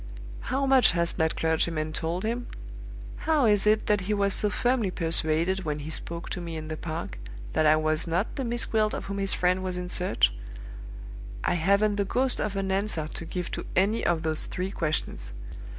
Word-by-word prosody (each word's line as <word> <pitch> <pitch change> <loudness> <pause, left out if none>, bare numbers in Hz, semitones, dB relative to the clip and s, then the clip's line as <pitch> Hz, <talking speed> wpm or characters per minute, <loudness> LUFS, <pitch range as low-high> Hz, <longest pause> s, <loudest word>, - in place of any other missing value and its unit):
How 270 +2 -1
much 265 -7 +5
has 170 -1 0
that 160 0 0
clergyman 160 -1 0
told 165 +4 -2
him? 240 +2 -2 0.7
How 310 -4 +2
is 210 -2 +3
it 215 +1 +4
that 210 -1 +2
he 205 +3 -1
was 200 -1 +2
so 210 - +1
firmly 240 -1 +1
persuaded, 165 +2 +1
when 150 -3 -2
he 150 +1 -6
spoke 170 +1 -2
to 180 - -3
me 165 -2 -5
in 155 0 -6
the 155 - -3
park, 160 - -5 0.3
that 155 - +3
I 155 - +7
was 155 +1 +1
not 175 +6 -1
the 270 - -2
Miss 240 -1 -1
Gwilt 215 -1 +1
of - - -5
whom 200 0 -4
his 195 -1 +1
friend 180 +1 +2
was 185 -1 -2
in 180 0 -4
search? 180 - +2 1.1
I - - +2
haven't 200 +5 +2
the 200 - +1
ghost 255 +6 +1
of 205 -1 -2
an 195 -1 -1
answer 190 -5 0
to 165 - -6
give 180 +1 -4
to - - -5
any 200 +5 +2
of 170 -1 +1
those 155 -1 -1
three 185 +2 -3
questions. 150 - -3
180 Hz, 200 wpm, -27 LUFS, 160-210 Hz, 1.1 s, I